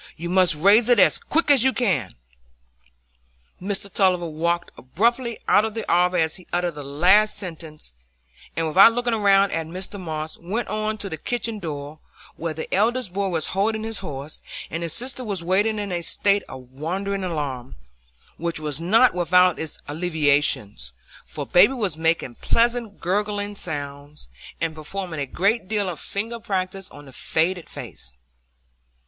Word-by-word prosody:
You 170 +2 -5
must 185 -3 +6
raise 205 +9 +5
it 245 - +5
as 195 - +5
quick 320 -1 +1
as 270 -4 +7
you 265 0 +4
can." 170 - -1 1.5
Mr 200 +1 -2
Tulliver 185 -3 +1
walked 170 +2 -2
abruptly 235 - 0
out 210 - +5
of 220 -1 -3
the 225 - -4
arbour 180 +1 +3
as 160 0 0
he 180 - -17
uttered 175 -1 0
the 145 - -8
last 180 +11 +3
sentence, 160 - -8 0.6
and, 165 - 0
without 195 +8 +7
looking 245 0 -1
round 200 -2 +4
at 165 -1 -2
Mr 185 +4 -6
Moss, 155 -3 -5
went 205 +8 -3
on 215 0 -2
to 205 - -4
the 160 -4 -5
kitchen 230 +4 -2
door, 150 -3 -6 0.4
where 165 -2 -4
the 160 - -6
eldest 220 0 +1
boy 200 +1 -1
was 165 -5 0
holding 215 +3 0
his 225 -1 -3
horse, 150 -4 -6 0.3
and 165 - -3
his 170 -1 -1
sister 255 - -1
was 200 -7 -2
waiting 205 +5 +1
in 205 -2 -3
a 175 -1 -1
state 200 +4 +2
of 130 -1 -10
wondering 190 +8 -3
alarm, 145 -8 -4 0.6
which 170 0 -2
was 150 0 -1
not 225 +9 +4
without 180 0 +3
its 160 -2 -5
alleviations, 145 - +1 0.3
for - - -6
baby 190 +9 +5
was 205 - -2
making 160 -5 0
pleasant 235 - 0
gurgling 205 +2 -2
sounds, 145 - -7 0.3
and 165 -1 -1
performing 165 +1 -6
a 140 - -2
great 200 - 0
deal 205 -1 0
of 175 -4 -2
finger 225 +4 -2
practice 190 -2 -3
on 145 - -13
the 135 - -14
faded 170 +6 -1
face. 60 -1 -6
180 Hz, 165 wpm, -23 LUFS, 160-205 Hz, 1.5 s, as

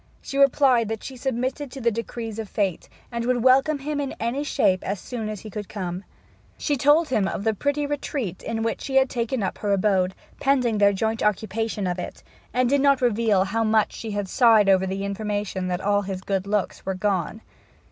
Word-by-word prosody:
She 275 - -4
replied 265 -4 +4
that 220 -1 -4
she 265 - -7
submitted 260 +2 -2
to 270 - -8
the 235 -2 +2
decrees 225 0 -5
of 220 -3 -5
Fate, 195 -5 -2 0.2
and 235 -1 -2
would 245 -1 +1
welcome 270 +4 +4
him 290 +1 -3
in 275 - -4
any 235 +6 -1
shape 195 -10 +1
as 200 0 -3
soon 225 -1 -5
as 210 -3 -6
he 215 - -9
could 210 -1 -6
come. 185 -2 -4 0.5
She 290 - 0
told 295 +4 +4
him 210 -6 +1
of 195 - -3
the 220 0 +2
pretty 285 +7 -1
retreat 280 - -3
in 225 -1 -3
which 225 - -2
she 270 - -4
had 265 -1 +4
taken 235 -1 -1
up 190 - -3
her 205 - -1
abode, 190 -2 +2 0.2
pending 250 -6 +2
their 200 0 +6
joint 220 +3 -1
occupation 210 0 -1
of 180 0 -2
it, 180 - -7 0.3
and 250 +2 +2
did 280 +2 +2
not 280 -1 +4
reveal 225 -5 +2
how 220 +4 -1
much 215 -1 +2
she 225 - -6
had 205 -1 -2
sighed 220 -2 +5
over 190 0 +4
the 195 +1 -3
information 200 -2 -3
that 180 0 -2
all 205 +1 +2
his 190 -2 -5
good 195 0 -2
looks 205 -2 -1
were 190 - -2
gone. 195 +1 -1
220 Hz, 210 wpm, -24 LUFS, 200-255 Hz, 0.5 s, their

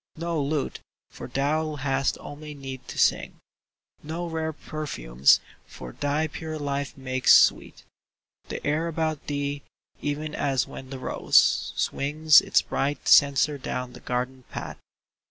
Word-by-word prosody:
No 165 -1 -2
lute, 140 0 -2 0.3
for - - -8
thou 150 +4 -1
hast 135 -1 0
only 150 +1 -9
need 135 -2 -8
to - - -8
sing; - - +1 0.6
No 165 +3 -5
rare 160 -1 -2
perfumes, 70 - +1 0.3
for 65 -1 -9
thy 145 - -1
pure 155 0 -6
life 140 -1 -3
makes 130 -1 +5
sweet - - +2 0.6
The - - -6
air 155 +3 0
about 160 -2 -2
thee, 145 0 -2 0.4
even 150 +1 -3
as 135 -4 0
when 130 - -10
the 135 - -6
rose 130 - +3
Swings 150 +1 +4
its - - +2
bright 140 +2 -2
censer 140 0 +5
down 125 -1 -4
the - - -11
garden 125 +1 -3
path. - - -7
145 Hz, 135 wpm, -26 LUFS, 135-155 Hz, 0.6 s, makes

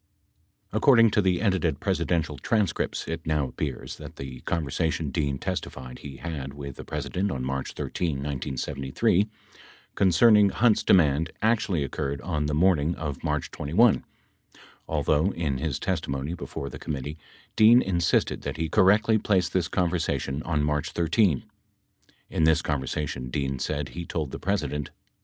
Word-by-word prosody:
According 115 0 +5
to 105 - +3
the 95 -2 +1
edited 95 -5 +1
presidential 85 -3 -1
transcripts, 105 -8 -1
it 80 0 -4
now 75 -4 0
appears 70 -1 -5
that - - -10
the 65 -2 -7
conversation 80 -1 -1
Dean 70 -1 -1
testified 65 -1 -5
he 70 -2 -9
had 70 -5 -5
with 70 -2 -7
the - - -7
President 100 +3 -2
on 65 -7 -3
March 65 0 -3
13, 85 -4 -2
1973, 70 - -1 0.7
concerning 105 +2 +5
Hunt's 110 +3 +3
demand 80 -3 +3
actually 105 -9 +2
oc 65 - -8
curred 70 -2 -3
on 75 -4 -1
the 75 - -1
morning 85 -1 +3
of 75 -4 -5
March - - -1
21, 95 +11 +3 0.8
although 75 +3 +2
in 75 -6 -2
his 75 -3 -1
testimony 70 +4 -2
before 70 -5 -6
the - - -8
committee 75 +2 -5 0.4
Dean 115 +3 +7
insisted 85 -3 +1
that - - -4
he 80 0 -2
correctly 110 +5 +4
placed 95 -3 +1
this 90 -4 +1
conversa 90 -2 0
tion 70 +2 -4
on 75 -3 -1
March 75 0 -1
13. 85 -1 +3
18 - - -29 0.8
In 80 - +1
this 80 +1 +3
conversation, 65 -2 -3
Dean 70 +1 -2
said, 75 -1 -2
he 85 - -6
told 75 -5 -3
the - - -6
President 75 -8 -2
80 Hz, 150 wpm, -26 LUFS, 70-90 Hz, 0.8 s, Dean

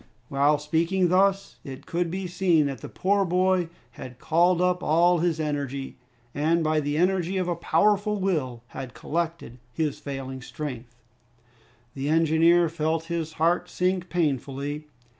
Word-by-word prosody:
While 145 +2 +3
speaking 165 +5 +1
thus, 195 +2 +2
it 135 -1 -9
could 170 0 -1
be 190 +2 -4
seen 175 -3 +2
that 135 -5 -4
the - - -7
poor 200 +1 +1
boy 180 -1 +1 0.2
had 125 +1 -10
called 170 +5 +2
up 180 0 +1
all 170 +2 +3
his 165 -1 0
energy, 140 -3 -3 0.4
and 160 +3 +1
by 155 0 +2
the 145 0 -2
energy 185 +1 +1
of 185 -1 -1
a 175 - 0
powerful 205 +5 +1
will 140 -11 -1
had 130 -2 -8
collected 165 -6 -4
his 155 0 -2
failing 135 -2 -6
strength. 125 -4 -7 1.0
The 140 +1 -3
engineer 165 +2 +4
felt 160 0 -1
his 160 -2 -3
heart 165 +3 +1
sink 180 0 -1
painfully. 145 -2 -2
165 Hz, 145 wpm, -25 LUFS, 145-180 Hz, 1.0 s, engineer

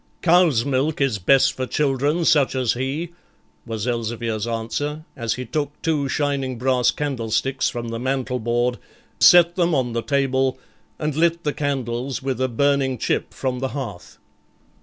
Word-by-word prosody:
'Cows' 165 -9 +4
milk 140 +3 0
is 135 -7 +1
best 135 +8 +4
for 130 0 -4
children 145 +4 0
such 145 -4 +3
as 125 -3 +1
he,' 135 +7 -3 0.6
was 110 -2 -3
Elzevir's 115 -2 -2
answer, 145 +7 -3
as 115 -2 -2
he 125 - -5
took 145 +4 -3
two 150 -4 0
shining 140 -3 -1
brass 125 0 +2
candlesticks 135 -1 -1
from 120 -1 -5
the 115 0 -4
mantel 130 0 -1
board, 120 +2 0 0.4
set 175 -1 +7
them 175 -3 +2
on 125 -3 0
the 115 - -1
table, 135 -1 +1 0.4
and 150 -2 -2
lit 170 +1 +2
the 150 - -1
candles 135 -1 -3
with 130 -2 -2
a 130 - +2
burning 135 +1 +1
chip - - -1
from 130 -2 -3
the 135 - -1
hearth. 120 -10 -7
130 Hz, 160 wpm, -22 LUFS, 120-145 Hz, 0.6 s, set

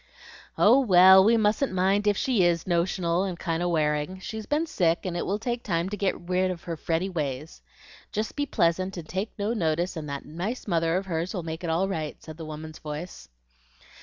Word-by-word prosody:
"Oh, 240 +6 +6
well, 190 -5 +7
we 230 +3 +4
mustn't 220 +5 +1
mind 195 +3 +2
if 205 -1 +3
she 240 -8 +2
IS 170 -1 +2
notional 175 0 +1
and 185 -3 -3
kind 165 -1 -2
of 175 - 0
wearing; 150 +2 0
she's 220 +2 -6
been 300 +3 +1
sick, 170 - +1
and 180 -2 -3
it 175 - -2
will 200 - 0
take 235 +2 -3
time 170 -3 -1
to 210 - -3
get 195 -2 -1
rid 185 +1 +1
of 180 -2 -5
her 170 - -4
fretty 165 +3 -1
ways. 150 -4 -4 0.5
Jest 215 0 -3
be 285 0 -1
pleasant, 185 - 0
and 165 -2 -7
take 190 +7 -3
no 210 +2 -1
notice, 170 -3 0
and 155 -2 -6
that 140 0 -5
nice 190 +12 -5
mother 165 -2 +1
of 195 - -3
hers 170 +1 -3
will 180 - -3
make 160 +1 -6
it 170 - -2
all 170 +4 +1
right," 160 -6 -4
said 155 -1 -10
the 165 - -7
woman's 155 0 -8
voice. 155 +4 -7
180 Hz, 215 wpm, -26 LUFS, 165-200 Hz, 0.5 s, well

